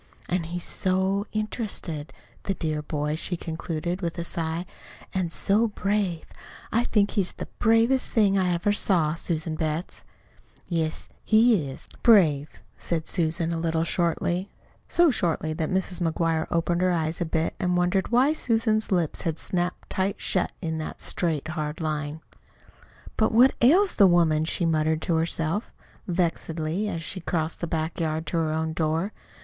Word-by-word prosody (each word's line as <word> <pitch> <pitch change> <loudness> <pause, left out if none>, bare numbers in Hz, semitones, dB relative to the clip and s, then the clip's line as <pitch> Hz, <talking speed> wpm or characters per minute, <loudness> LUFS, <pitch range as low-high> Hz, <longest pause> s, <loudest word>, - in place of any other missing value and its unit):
"An' 175 -2 0
he's 175 +1 -4
so 190 +2 0
interested 210 -8 -3 0.3
the 195 - -1
dear 155 -3 -2
boy!" 150 0 -2
she 175 +2 -3
concluded, 170 +2 -4
with 170 0 -3
a 170 - -2
sigh. 165 +1 -3 0.5
"An' 185 -3 0
so 205 +6 +3
brave! 200 -4 -1 0.5
I 235 +2 +2
think 205 -4 +2
he's 195 -4 0
the - - -6
bravest 225 +4 +3
thing 205 -3 +3
I 185 -2 +2
ever 175 +4 +1
saw, 170 -7 +2
Susan 165 -1 -2
Betts." 155 +2 -3 0.6
"Yes, 160 -3 -1 0.2
he 220 - +4
is 135 - -10
brave," 155 - +4 0.2
said 165 -2 -2
Susan, 165 -1 0
a 165 - -2
little 165 0 0
shortly 175 +2 0 0.4
so 345 -3 +4
shortly 165 -7 -1
that 155 -1 -2
Mrs. 185 -1 -1
McGuire 165 -1 0
opened 170 +1 0
her 185 - +3
eyes 160 -1 -1
a - - +4
bit, 160 0 -1
and 180 -1 +1
wondered 180 +2 +1
why 255 +5 +4
Susan's 225 -6 +1
lips 175 -5 0
had 165 -2 -2
snapped 180 +1 -2
tight 190 +1 -1
shut 185 - +1
in 160 -1 -2
that 155 - -6
straight, 160 -3 0
hard 155 -1 -3
line. 155 -1 -3 1.0
"But 220 - +3
what 250 +4 +6
ails 355 +11 +5
the 200 - +6
woman?" 165 -3 +3
she 170 +1 -1
muttered 155 -1 +1
to 165 - +1
herself, 165 +4 -1 0.4
vexedly, 170 +1 -1
as 165 -3 -4
she 185 - -5
crossed 160 -1 -2
the 170 - -1
back 160 +1 -2
yard 160 -1 -1
to 155 +2 -2
her 160 -1 +1
own 160 0 -1
door. 165 +5 -1
170 Hz, 160 wpm, -26 LUFS, 160-195 Hz, 1.0 s, what